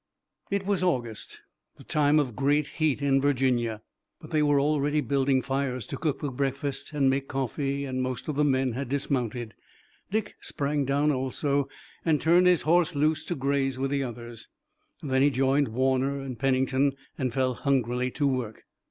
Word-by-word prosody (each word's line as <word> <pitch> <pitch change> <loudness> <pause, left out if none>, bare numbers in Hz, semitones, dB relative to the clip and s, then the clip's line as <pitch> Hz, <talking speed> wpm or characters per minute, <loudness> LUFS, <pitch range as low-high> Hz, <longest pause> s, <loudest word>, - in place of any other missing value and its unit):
It 200 -1 -1
was 200 -2 0
August, 120 - -2 0.3
the - - -15
time 150 0 +3
of 130 -7 -1
great 145 +2 +2
heat 150 -3 +1
in 135 -1 +3
Virginia, 125 -5 +1 0.4
but 155 - -12
they 155 -2 +2
were 145 -1 +3
already 145 +1 +1
building 135 -1 +1
fires 135 -3 -2
to - - -5
cook 155 -4 -1
the 145 -3 -2
breakfast 135 +2 -3
and 145 -3 +2
make 135 +1 +1
coffee, 135 +2 -2
and 130 -1 -2
most 130 -2 -3
of 155 - -2
the 150 - +2
men 130 -2 +2
had 130 +2 -4
dismounted. 125 -5 -2 0.6
Dick 210 +1 -2
sprang 145 0 -1
down 140 +3 +2
also 140 +1 -1 0.3
and 155 -3 +2
turned 175 +3 +4
his 180 -2 +4
horse 170 0 +3
loose 155 +2 +1
to 175 - -2
graze 135 -1 0
with 135 +1 -1
the 140 -1 +1
others. 120 -2 -7 0.6
Then 130 -2 +1
he 145 - +5
joined 135 +1 +2
Warner 130 +4 0
and 130 -4 -6
Pennington 135 +1 +2 0.2
and 130 -6 -2
fell 130 0 +1
hungrily 125 -1 0
to 145 +3 -1
work. 125 -5 -2
135 Hz, 175 wpm, -27 LUFS, 130-145 Hz, 0.6 s, he